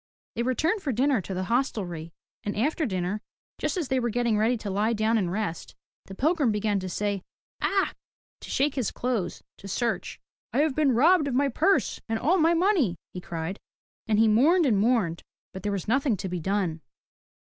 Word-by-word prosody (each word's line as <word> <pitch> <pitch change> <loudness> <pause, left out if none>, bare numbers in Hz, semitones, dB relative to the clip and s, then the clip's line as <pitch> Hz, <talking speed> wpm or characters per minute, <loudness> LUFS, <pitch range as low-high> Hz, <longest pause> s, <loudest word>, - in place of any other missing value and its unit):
They 235 - -1
returned 310 - +1
for 290 - -1
dinner 260 0 +2
to 190 - -6
the 185 - -1
hostelry, 185 -8 -2 0.3
and 205 - -3
after 300 +6 +1
dinner, 185 +1 -2 0.4
just - - -1
as 325 -7 -2
they 260 - +2
were 240 -1 0
getting 235 0 +1
ready 225 +4 +2
to 210 -3 -5
lie 210 +4 +1
down 220 +1 +1
and 185 -6 +1
rest, 195 -4 -4 0.3
the 195 - -9
pilgrim 295 - +2
began 210 -1 0
to 185 0 -5
say 200 +1 -1 0.4
Akh! 390 0 +1 0.5
to - - -10
shake 280 +1 +1
his 255 -6 -1
clothes, 235 -8 -2 0.2
to 195 - -9
search. 230 +3 -2 0.3
"I - - +3
have 305 -2 +2
been 285 -2 +2
robbed 310 +4 +5
of 260 - -1
my 280 +2 +3
purse 390 +10 +1
and 225 - 0
all 340 +11 +2
my 330 +1 +4
money, 335 - +2 0.2
he 180 - -6
cried. 170 +3 -5 0.5
And 215 -1 +2
he 225 +1 +5
mourned 300 +11 +4
and 220 -7 +3
mourned, 210 -7 +1 0.3
but 190 - -7
there 205 +1 -2
was 195 -3 -3
nothing 255 -1 +2
to 190 - -4
be 180 -1 -3
done. 180 -2 -1
225 Hz, 200 wpm, -27 LUFS, 195-275 Hz, 0.5 s, robbed